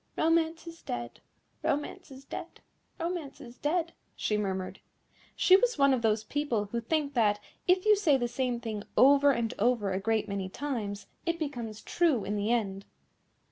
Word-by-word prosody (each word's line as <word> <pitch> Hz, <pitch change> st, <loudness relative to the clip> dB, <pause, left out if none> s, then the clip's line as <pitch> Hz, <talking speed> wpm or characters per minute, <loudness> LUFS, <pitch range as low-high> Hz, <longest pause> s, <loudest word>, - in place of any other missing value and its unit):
"Romance 325 Hz, 0 st, +2 dB
is 335 Hz, 0 st, -10 dB
dead, 120 Hz, 0 st, -5 dB, 0.4 s
Romance 290 Hz, 0 st, -2 dB
is 270 Hz, 0 st, -12 dB
dead, 345 Hz, +2 st, -8 dB, 0.4 s
Romance 335 Hz, -5 st, -4 dB
is 245 Hz, -4 st, -12 dB
dead," 335 Hz, +2 st, 0 dB, 0.2 s
she 210 Hz, -, -1 dB
murmured. 190 Hz, -3 st, -2 dB, 0.6 s
She 370 Hz, -, +6 dB
was -, -, +2 dB
one 275 Hz, -1 st, +5 dB
of 255 Hz, -, 0 dB
those 220 Hz, -1 st, +2 dB
people 245 Hz, -5 st, -1 dB
who 235 Hz, -, -1 dB
think 290 Hz, +3 st, -1 dB
that, 210 Hz, -4 st, +3 dB, 0.3 s
if 365 Hz, +1 st, +3 dB
you 425 Hz, 0 st, +7 dB
say 335 Hz, -9 st, +3 dB
the 240 Hz, -2 st, -1 dB
same 245 Hz, 0 st, -1 dB
thing 220 Hz, -3 st, -4 dB, 0.2 s
over 280 Hz, +2 st, +7 dB
and 235 Hz, -4 st, +1 dB
over 220 Hz, -3 st, +2 dB
a 190 Hz, -, 0 dB
great 215 Hz, +1 st, 0 dB
many 195 Hz, -2 st, -3 dB
times, 205 Hz, -5 st, -4 dB, 0.2 s
it 335 Hz, 0 st, +1 dB
becomes 240 Hz, -9 st, -5 dB
true 315 Hz, -, +2 dB
in 205 Hz, -, -2 dB
the 205 Hz, +2 st, 0 dB
end. 200 Hz, -5 st, 0 dB
250 Hz, 175 wpm, -29 LUFS, 210-315 Hz, 0.6 s, you